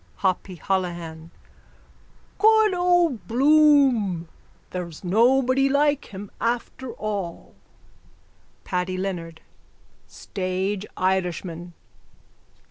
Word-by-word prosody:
HOPPY 185 0 0
HOLOHAN: 170 -3 -3 1.1
Good 435 -1 +5
old 355 - +2
Bloom! 265 - +4 0.4
There's 175 -3 -6
nobody 255 +7 +3
like 290 +1 +2
him 200 0 -9
after 240 +2 -2
all. 200 -5 -5 1.1
PADDY 185 0 -2
LEONARD: 175 -4 -5 0.7
Stage 190 +2 -3
Irishman! 180 -2 -2
195 Hz, 70 wpm, -24 LUFS, 180-270 Hz, 1.1 s, Good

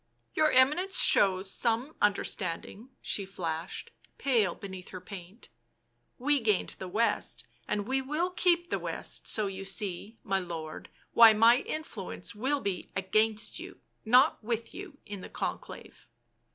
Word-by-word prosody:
" - - -37
Your 310 0 +3
Eminence 300 +9 +4
shows 190 -1 +4
some 240 +6 0
understanding," 200 +2 -1
she 200 - +1
flashed, 170 -3 -5 0.3
pale 225 -10 +2
beneath 190 -2 -9
her 185 - -7
paint; 185 +2 -10 0.7
"we 285 +3 +2
gained 215 -5 +1
the 190 - -5
West, 180 - -1 0.2
and 205 0 -2
we 265 +1 +1
will 305 +7 -1
keep 345 -1 +2
the - - 0
West, - - -5
so 215 - 0
you 195 -1 -5
see, 195 +2 -3
my 195 0 0
lord, 165 -4 -7 0.2
why 230 -1 +9
my 230 +3 +6
influence 235 - -5
will 270 +7 -1
be 195 -2 -3
against 215 +3 0
you, - - -10 0.2
not 250 +3 +4
with 230 0 -3
you, 280 - -9
in 205 -2 -7
the - - -9
Conclave." - - -6
215 Hz, 145 wpm, -30 LUFS, 190-260 Hz, 0.7 s, why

